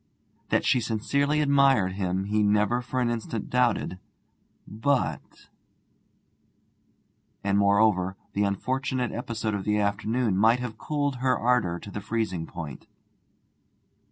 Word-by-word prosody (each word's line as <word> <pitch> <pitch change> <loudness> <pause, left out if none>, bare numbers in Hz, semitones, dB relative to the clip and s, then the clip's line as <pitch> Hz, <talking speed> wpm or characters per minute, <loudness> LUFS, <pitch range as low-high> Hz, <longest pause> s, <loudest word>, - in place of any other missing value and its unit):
That - - +1
she 130 - +3
sincerely 140 +7 0
admired 140 -9 +4
him 95 0 -2
he 105 +2 0
never 105 +3 +2
for 125 +1 -2
an 120 -1 +1
instant 115 -2 -4
doubted. 125 -7 +1 0.7
But 130 +5 -2 1.9
And, 100 0 +1
moreover, 100 -2 +3 0.2
the 100 - +1
unfortunate 125 +5 -1
episode 115 -2 -3
of 100 -1 -2
the 105 +1 +1
afternoon 105 +1 0
might 115 +4 +4
have 115 -3 -6
cooled 145 -2 -1
her 130 -1 +1
ardour 115 -8 +1
to 105 0 -7
freezing 100 -6 -2
point. 80 -5 -8
110 Hz, 120 wpm, -26 LUFS, 100-125 Hz, 1.9 s, admired